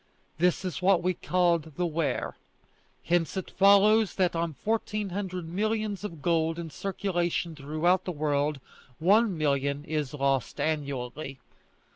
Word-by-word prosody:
This 180 +2 +2
is 185 - -3
what 180 -2 +3
is 185 -1 +2
called 170 -4 +1
the 180 - +1
Wear. 155 -5 -1 0.7
Hence 170 +1 0
it 190 - -4
follows 200 +2 +5
that 180 -3 +1
on 165 -2 -1
fourteen 215 0 -2
hundred 185 -2 -4
millions 210 +2 -1
of 165 -8 -7
gold 165 -1 +1
in 165 -2 -6
circulation 175 -2 -2
throughout 155 +6 +1
the 180 - -2
world, 145 -2 0 0.4
one 200 +3 +3
million 140 -1 0
is 150 -3 -2
lost 135 -2 0
annually. 140 -2 -3
170 Hz, 135 wpm, -28 LUFS, 150-190 Hz, 0.7 s, follows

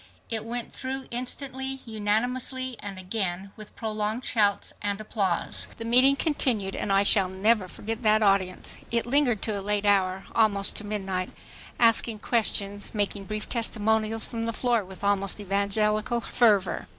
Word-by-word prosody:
It 220 -1 0
went 235 +1 -2
through 265 0 -4
instantly, 265 +2 -3
unanimously, 245 +4 0
and 200 -2 -6
again 185 0 -2
with 215 -1 -10
prolonged 215 +2 -2
shouts 205 -3 +1
and 205 0 -1
applause. 200 -5 +1
The 230 - -6
meeting 255 +4 +5
continued 245 - 0
and 200 - -2
I 195 0 +4
shall 195 -2 +4
never 195 +1 +2
forget 225 +5 -5
that 215 -1 +3
audience. 195 -2 +1
It 235 -1 0
lingered 245 -4 +1
to 210 -3 0
a - - -6
late 205 +1 -1
hour, 190 -2 +2
almost 205 -3 +2
to - - -4
midnight, 190 -3 -3 0.5
asking 230 -1 +3
questions, 205 -2 -1
making 205 -1 -2
brief 215 +1 -4
"testimonials" 220 -1 +1
from 230 -1 -4
the 230 - -2
floor 235 -2 +1
with 190 +1 -12
almost 200 0 +1
evangelical 210 +3 0
fervor. 210 - +2
215 Hz, 150 wpm, -26 LUFS, 200-235 Hz, 0.5 s, meeting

